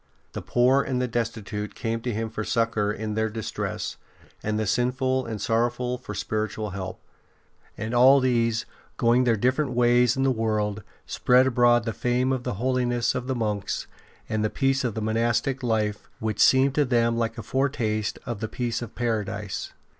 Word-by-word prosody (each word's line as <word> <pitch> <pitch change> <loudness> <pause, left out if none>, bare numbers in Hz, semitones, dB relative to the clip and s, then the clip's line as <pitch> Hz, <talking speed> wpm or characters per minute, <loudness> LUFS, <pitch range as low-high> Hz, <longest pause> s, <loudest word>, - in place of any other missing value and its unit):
The - - -5
poor 125 +3 +3
and 130 -2 -2
the 125 - 0
destitute 110 -3 -3
came 115 0 -2
to 120 - -2
him 110 0 -3
for 110 -1 -3
succour 115 -3 0
in 110 0 -4
their 110 +1 0
distress, 110 0 -4 0.4
the 110 0 -1
sinful 130 +4 0
and 110 -2 -4
sorrowful 120 +3 0
for 105 -5 -7
spiritual 110 +1 -2
help. 95 -1 -6 0.8
And 110 +2 -4
all 130 +3 +7
these, 115 -3 +1 0.3
going 120 +2 +3
their 115 -2 +3
different 130 +5 +1
ways 120 0 +3
in 135 - +1
the 135 - +3
world, 110 -3 -1 0.2
spread 125 +1 +3
abroad 120 -2 +4
the 115 -1 -3
fame 125 +2 +1
of 130 - -2
the 125 -3 -3
holiness 120 +1 0
of 125 0 -4
the 130 - -1
monks 105 -4 -2 0.4
and 110 0 -1
the 110 - +1
peace 135 +1 +1
of 120 -4 -2
the 110 - -2
monastic 115 +4 0
life, 110 -3 -1
which 110 -2 -3
seemed 130 +1 +5
to 145 0 +2
them 115 -2 +2
like 115 0 -1
a 115 - -5
foretaste 120 -6 -1
of 120 -4 -4
the 110 - -3
peace 120 -2 -2
of 120 -3 -8
Paradise. 105 -4 -3
115 Hz, 175 wpm, -25 LUFS, 110-125 Hz, 0.8 s, all